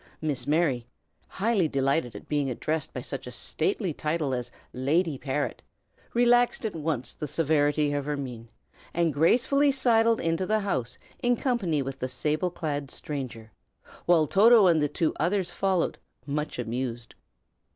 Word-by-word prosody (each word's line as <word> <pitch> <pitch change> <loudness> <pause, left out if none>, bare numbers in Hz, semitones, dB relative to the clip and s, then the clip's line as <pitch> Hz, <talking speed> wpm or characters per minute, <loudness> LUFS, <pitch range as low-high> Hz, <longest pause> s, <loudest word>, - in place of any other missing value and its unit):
Miss 140 -5 -2
Mary, 145 -6 +1 0.4
highly 200 -4 +1
delighted 135 -2 0
at - - -10
being 145 -2 0
addressed 155 +5 -2
by - - -5
such - - -5
a - - -6
stately 230 - -1
title 150 -2 -1
as 125 -1 -3 0.2
"Lady 150 +5 +1
Parrot," 140 +2 -3 0.5
relaxed 245 0 +3
at 215 - -2
once 155 -5 -3
the 150 - -5
severity 145 -1 +2
of 145 -1 -2
her 150 0 -2
mien, 120 -4 -7 0.5
and 170 -2 +2
gracefully 255 - +3
sidled 230 -4 +3
into 165 +3 0
the 215 0 +2
house 130 -12 -2 0.2
in 245 0 +3
company 200 - 0
with 135 0 -6
the 130 - -3
sable 150 +7 -1
clad 145 -5 -4
stranger, 125 -8 -6 0.6
while 170 -3 +5
Toto 215 +5 +6
and 165 -4 +4
the 150 - +1
two 160 +2 0
others 180 +2 0
followed, 190 -3 0 0.3
much 150 +1 -3
amused. 120 0 -4
155 Hz, 150 wpm, -27 LUFS, 135-190 Hz, 0.6 s, Toto